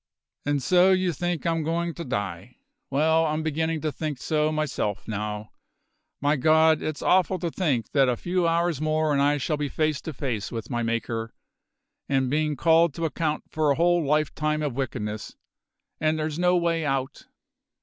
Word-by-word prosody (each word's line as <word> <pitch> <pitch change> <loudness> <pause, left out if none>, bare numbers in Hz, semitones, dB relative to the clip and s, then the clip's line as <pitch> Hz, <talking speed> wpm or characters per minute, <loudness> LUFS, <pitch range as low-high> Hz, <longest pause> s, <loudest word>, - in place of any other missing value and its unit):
And 145 -2 0
so 180 +6 +5
you 185 -2 +1
think 175 +1 -2
I'm 165 -1 +1
goin' 170 +2 -1
to 170 - -6
die? 100 - -4 0.3
Well, 160 +4 +3
I'm 155 +1 -1
beginnin' 160 +1 -1
to 155 - -1
think 150 0 -4
so 155 +3 0
myself 135 -10 -2
now. 105 0 -4 0.7
My 145 +1 +2
God! 160 +3 +4
it's 155 -2 -4
awful 185 0 +3
to 170 -2 -3
think 140 - -1
that 135 -3 +4
a 120 - 0
few 175 +3 0
hours 165 -3 +1
more 155 0 +1
and 140 - +2
I 145 +1 +3
shall 150 +3 -1
be 145 -1 -2
face 155 -1 0
to 160 - -5
face 125 -7 -3
with 115 +2 -6
my 120 -1 -1
Maker, 115 0 -2 0.7
and 135 -2 +1
bein' 150 0 +1
called 165 +2 +3
to 165 - -2
account 155 -1 -1
for 155 -1 +1
a 140 - +3
whole 175 +1 +3
lifetime 155 +1 0
of 145 -4 -1
wickedness. 110 -5 -4 0.6
And 155 0 +1
there's 155 +1 -3
no 180 0 +3
way 170 -1 0
out!" 135 -2 -2
155 Hz, 180 wpm, -25 LUFS, 135-165 Hz, 0.7 s, so